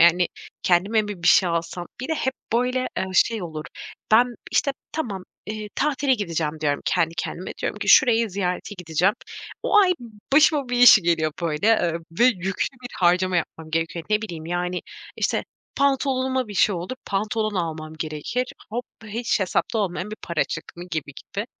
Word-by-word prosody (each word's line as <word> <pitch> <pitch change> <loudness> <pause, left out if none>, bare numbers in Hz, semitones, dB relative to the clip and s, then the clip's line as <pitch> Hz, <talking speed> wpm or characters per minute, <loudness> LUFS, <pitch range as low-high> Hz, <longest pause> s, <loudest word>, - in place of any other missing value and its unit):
Yani, 170 +1 +5 0.3
kendime 195 +5 +3
mi 205 -4 -6
bir - - +3
şey 185 - +6
alsam?" 170 +1 -3
Bir 260 - -5
de 320 - +1
hep 265 -3 -1 0.2
böyle, 250 +2 +1
eee, 190 - 0
şey 220 +1 +3
olur. 155 -3 -6 0.5
Ben, 240 +2 +5 0.2
işte, 280 - +2 0.2
"Tamam, 205 -12 -3 0.3
ııı, 215 -1 -5
tatile 275 -2 +2
gideceğim." 165 -7 -2
diyorum 145 -2 0
kendi 165 -2 +1
kendime, 175 +2 -4
diyorum - - -2
ki - - -4
"Şurayı 230 -4 +6
ziyarete 185 +1 -2
gideceğim." 180 +3 +1 0.5
O 420 - +4
ay 375 -3 +6 0.4
başıma 290 -2 +5
bir 245 - 0
iş 245 0 +10
geliyor, 165 -5 +1
böyle, 155 +2 0
eee, 195 -7 +3 0.3
ve 240 - +7
yüklü 190 -6 +1 0.2
bir 245 - -6
harcama 180 +1 +3
yapmam 160 -1 -4
gerekiyor. 165 +1 -2
Ne 210 +1 +2
bileyim, 170 -7 -6
yani, 180 +1 -2 0.3
işte, - - 0 0.3
pantolonuma 265 -3 +1
bir 205 - -7
şey 200 +1 +4
olur, 180 +9 -5
pantolon 215 +1 -1
almam 160 -3 -3
gerekir. 155 - -3 0.2
Hop, 240 +3 -3 0.2
hiç 230 +1 -1
hesapta 190 +4 0
olmayan 195 0 -2
bir 215 - -6
para 170 -3 0
çık - - -5
mı 175 - -7
gibi 150 -3 -3
gibi. 205 +8 -6
195 Hz, 170 wpm, -24 LUFS, 170-240 Hz, 0.5 s, iş